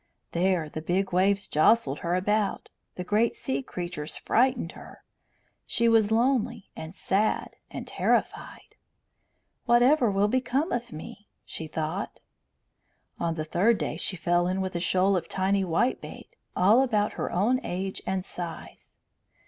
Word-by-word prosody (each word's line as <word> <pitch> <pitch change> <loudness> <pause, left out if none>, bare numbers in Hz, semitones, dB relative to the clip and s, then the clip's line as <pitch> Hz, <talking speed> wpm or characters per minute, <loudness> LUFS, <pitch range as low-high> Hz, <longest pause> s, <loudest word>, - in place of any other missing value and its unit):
There 175 -2 +1
the 155 +1 -6
big 180 +3 -1
waves 195 +2 +2
jostled 225 +10 +3
her 175 -1 -1
about, 210 +2 0 0.3
the 180 - -4
great 215 +5 +1
sea 135 +1 -2
creatures 170 0 -5
frightened 245 -7 +1
her. - - -13 0.6
She 235 0 +1
was 225 -2 +4
lonely 235 -2 +1
and 160 +3 -8
sad 205 +3 0
and - - -6
terrified. - - -1 0.9
"Whatever 240 +2 +5
will 200 +1 +2
become 260 - 0
of 240 0 -3
me?" 165 +6 -10 0.2
she 160 - -7
thought. 160 +5 -4 1.0
On 165 -1 -1
the 155 -1 -3
third 205 +8 +2
day - - -3
she 190 - -3
fell 175 +1 +1
in 185 +1 -1
with 190 -1 -3
a - - 0
shoal 185 +2 +2
of 175 - -2
tiny 195 +1 +1
whitebait, 215 - -2 0.2
all 210 +8 +5
about 215 -6 +1
her - - -3
own 225 +8 +2
age 190 +2 -4
and 190 -1 -1
size. 170 -4 -8
195 Hz, 145 wpm, -27 LUFS, 175-230 Hz, 1.0 s, Whatever